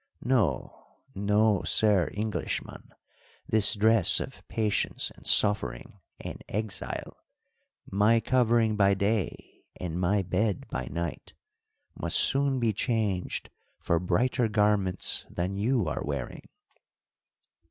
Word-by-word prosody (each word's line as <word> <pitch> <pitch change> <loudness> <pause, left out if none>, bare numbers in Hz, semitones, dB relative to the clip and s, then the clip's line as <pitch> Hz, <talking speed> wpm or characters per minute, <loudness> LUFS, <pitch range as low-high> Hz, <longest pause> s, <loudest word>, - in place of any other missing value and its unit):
No, 85 - -1 0.2
no, 105 0 +2
sir 105 -5 +2
Englishman, 105 +1 -4 0.6
this 105 -2 +3
dress 110 -2 +4
of - - -7
patience 110 -2 -1
and - - -10
suffering 100 - +2 0.2
and - - -8
exile, 105 -1 -4 0.7
my 105 +4 +3
covering 115 -2 +2
by 100 -1 +3
day 100 +1 -3 0.2
and 90 0 -4
my 95 +2 +1
bed 95 +2 -1
by 65 - -4
night, 85 -1 -5 0.6
must - - -1
soon 135 -1 +3
be 115 -3 +1
changed 105 -4 -2 0.3
for 85 - 0
brighter 115 +8 +1
garments 105 -3 0
than 90 +3 -3
you 110 -1 0
are 75 - -3
wearing." 70 -4 -5
105 Hz, 110 wpm, -28 LUFS, 90-110 Hz, 0.7 s, dress